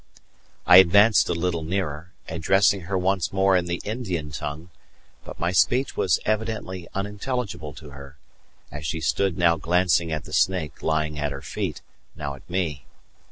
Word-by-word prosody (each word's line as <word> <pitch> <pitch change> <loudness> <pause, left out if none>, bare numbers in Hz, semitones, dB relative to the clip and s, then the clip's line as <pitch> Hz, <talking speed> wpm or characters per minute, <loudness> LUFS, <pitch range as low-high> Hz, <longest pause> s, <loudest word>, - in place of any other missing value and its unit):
I 90 - +8
advanced 100 +4 +6
a 90 - 0
little 85 -1 -1
nearer, 80 -2 -3 0.2
addressing 95 +4 +2
her 95 - 0
once 95 0 0
more 95 0 +3
in 90 -1 +1
the 85 0 -3
Indian 95 -10 -4
tongue; 75 +4 -6 0.5
but - - -10
my 85 +1 0
speech 125 +8 +2
was 90 - +2
evidently 110 -5 -2
unintelligible 105 - -4
to 75 +2 -12
her, 70 0 -12 0.5
as 75 +2 -7
she 80 +3 -2
stood 95 +2 0
now 85 -2 +3
glancing 85 0 +1
at 75 -3 -3
the - - -11
snake 90 -7 0
lying 75 -1 -1
at 75 -1 -1
her 70 -1 -7
feet, - - -4 0.3
now 75 -2 -5
at 70 - -15
me. 80 -7 -2
85 Hz, 160 wpm, -24 LUFS, 75-95 Hz, 0.5 s, I